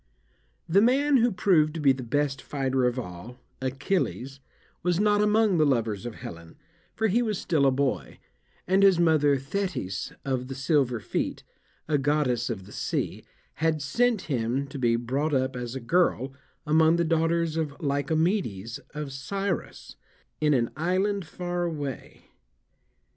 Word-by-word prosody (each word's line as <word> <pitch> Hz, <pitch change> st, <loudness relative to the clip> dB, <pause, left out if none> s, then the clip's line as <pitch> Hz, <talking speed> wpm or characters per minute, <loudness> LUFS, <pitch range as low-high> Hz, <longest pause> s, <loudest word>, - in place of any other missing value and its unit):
The 185 Hz, +4 st, +4 dB
man 275 Hz, +5 st, +4 dB
who 240 Hz, 0 st, +3 dB
proved 165 Hz, -5 st, +3 dB
to -, -, -3 dB
be 140 Hz, -3 st, +5 dB
the 130 Hz, 0 st, -2 dB
best 135 Hz, +2 st, -1 dB
fighter 135 Hz, -2 st, -1 dB
of 125 Hz, +1 st, -2 dB
all, 115 Hz, +2 st, -7 dB, 0.2 s
Achilles, 135 Hz, -1 st, -2 dB, 0.4 s
was 175 Hz, 0 st, +1 dB
not 205 Hz, 0 st, +3 dB
among 210 Hz, -3 st, +3 dB
the -, -, +5 dB
lovers 115 Hz, -7 st, 0 dB
of 120 Hz, -, -7 dB
Helen, 85 Hz, -1 st, -10 dB, 0.4 s
for 220 Hz, -, +1 dB
he 225 Hz, +4 st, +2 dB
was 215 Hz, -4 st, -1 dB
still 150 Hz, -6 st, +2 dB
a -, -, +4 dB
boy, 135 Hz, +1 st, -1 dB, 0.5 s
and 190 Hz, +2 st, +3 dB
his 195 Hz, -3 st, +6 dB
mother, 155 Hz, -4 st, +4 dB
Thetis 135 Hz, -, -3 dB
of 130 Hz, -2 st, -1 dB
the 135 Hz, -, -6 dB
silver 135 Hz, -3 st, +1 dB
feet, 100 Hz, -, -3 dB, 0.4 s
a 150 Hz, -2 st, +2 dB
goddess 135 Hz, -4 st, +1 dB
of 100 Hz, -5 st, -4 dB
the 100 Hz, -, -14 dB
sea, -, -, -3 dB, 0.4 s
had 160 Hz, -1 st, +2 dB
sent 220 Hz, -, +1 dB
him 130 Hz, -2 st, -1 dB
to 140 Hz, -, -7 dB
be 120 Hz, -2 st, +3 dB
brought 135 Hz, +6 st, -1 dB
up 130 Hz, 0 st, 0 dB
as 120 Hz, 0 st, -5 dB
a -, -, -3 dB
girl, 135 Hz, -1 st, +1 dB, 0.3 s
among 160 Hz, +2 st, +4 dB
the 170 Hz, -, +2 dB
daughters 165 Hz, 0 st, +1 dB
of 155 Hz, -2 st, -3 dB
Lycomedes 145 Hz, -, -1 dB, 0.2 s
of 150 Hz, -2 st, -5 dB
Scyros, 195 Hz, +7 st, -4 dB, 0.4 s
in 150 Hz, -1 st, +3 dB
an 120 Hz, -2 st, 0 dB
island 190 Hz, +4 st, 0 dB
far 175 Hz, +1 st, -4 dB
away. 145 Hz, -6 st, -5 dB
145 Hz, 155 wpm, -27 LUFS, 130-175 Hz, 0.5 s, his